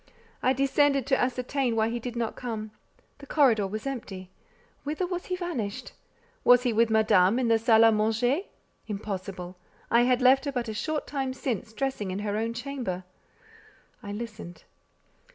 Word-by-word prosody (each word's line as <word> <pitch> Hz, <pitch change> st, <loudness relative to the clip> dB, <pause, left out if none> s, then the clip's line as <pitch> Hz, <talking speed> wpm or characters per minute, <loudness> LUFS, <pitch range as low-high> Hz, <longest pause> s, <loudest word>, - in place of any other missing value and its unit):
I 260 Hz, -, +3 dB
descended 275 Hz, 0 st, +2 dB
to 270 Hz, -1 st, +2 dB
ascertain 250 Hz, 0 st, 0 dB
why 220 Hz, 0 st, +2 dB
he 240 Hz, +1 st, -3 dB
did 245 Hz, +1 st, -6 dB
not 235 Hz, -2 st, -2 dB
come. 220 Hz, -3 st, -5 dB, 0.5 s
The 280 Hz, -, -12 dB
corridor 235 Hz, -9 st, +3 dB
was 215 Hz, +4 st, -5 dB
empty. 195 Hz, -9 st, -6 dB, 0.5 s
Whither 305 Hz, +5 st, -2 dB
was 355 Hz, 0 st, -4 dB
he 365 Hz, -, -1 dB
vanished? 295 Hz, -, -4 dB, 0.5 s
Was 245 Hz, 0 st, +6 dB
he 245 Hz, -3 st, +1 dB
with 230 Hz, +1 st, +3 dB
Madame 215 Hz, -2 st, +4 dB
in 250 Hz, -2 st, +1 dB
the 225 Hz, -1 st, +4 dB
salle 225 Hz, 0 st, +5 dB
à 225 Hz, -1 st, +6 dB
manger? 225 Hz, +6 st, +1 dB, 0.5 s
Impossible: 190 Hz, -3 st, -5 dB, 0.3 s
I 235 Hz, -, +5 dB
had 250 Hz, 0 st, +3 dB
left 265 Hz, +2 st, +5 dB
her 280 Hz, -, -1 dB
but 245 Hz, -3 st, -3 dB
a 220 Hz, -, -3 dB
short 305 Hz, +8 st, -2 dB
time 265 Hz, -2 st, -3 dB
since, 235 Hz, -4 st, -3 dB
dressing 225 Hz, -3 st, -3 dB
in 185 Hz, -, -3 dB
her 205 Hz, 0 st, -1 dB
own 225 Hz, +2 st, -2 dB
chamber. 240 Hz, -8 st, -4 dB, 1.0 s
I 205 Hz, -4 st, -7 dB
listened. 215 Hz, -5 st, -7 dB
235 Hz, 170 wpm, -27 LUFS, 215-265 Hz, 1.0 s, Was